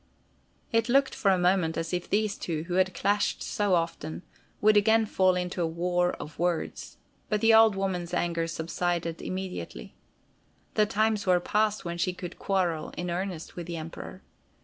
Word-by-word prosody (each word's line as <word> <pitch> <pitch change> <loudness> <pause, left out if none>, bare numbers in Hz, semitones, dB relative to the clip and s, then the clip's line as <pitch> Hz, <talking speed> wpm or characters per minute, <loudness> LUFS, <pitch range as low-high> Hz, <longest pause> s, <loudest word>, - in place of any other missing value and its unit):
It 230 +1 +2
looked 270 +2 +3
for 200 - +1
a 190 - +4
moment 180 -2 +2
as 165 +1 -3
if 180 -1 -2
these 210 0 +1
two, 160 -3 -3
who 175 +1 -5
had 185 0 +2
clashed 205 +3 0
so 205 -3 +1
often, 125 - -3 0.4
would 215 0 +5
again 220 +2 +4
fall 185 -3 +3
into 180 0 -2
a 165 - +2
war 175 +2 0
of 150 +1 -9
words, 175 -1 -2 0.3
but 210 - +1
the 225 +1 +5
old 220 -2 +7
woman's 185 -3 -2
anger 170 -1 0
subsided 165 0 -2
immediately. 180 - -6 0.8
The 210 -1 +3
times 215 -1 +1
were 180 -1 +5
past 210 +2 0
when 170 0 -4
she 180 +1 +1
could 180 -1 -8
quarrel 175 -6 0
in 175 0 -3
earnest 180 -2 -4
with 175 -1 -6
the 170 -1 -4
Emperor. 165 +3 -8
180 Hz, 170 wpm, -28 LUFS, 170-205 Hz, 0.8 s, old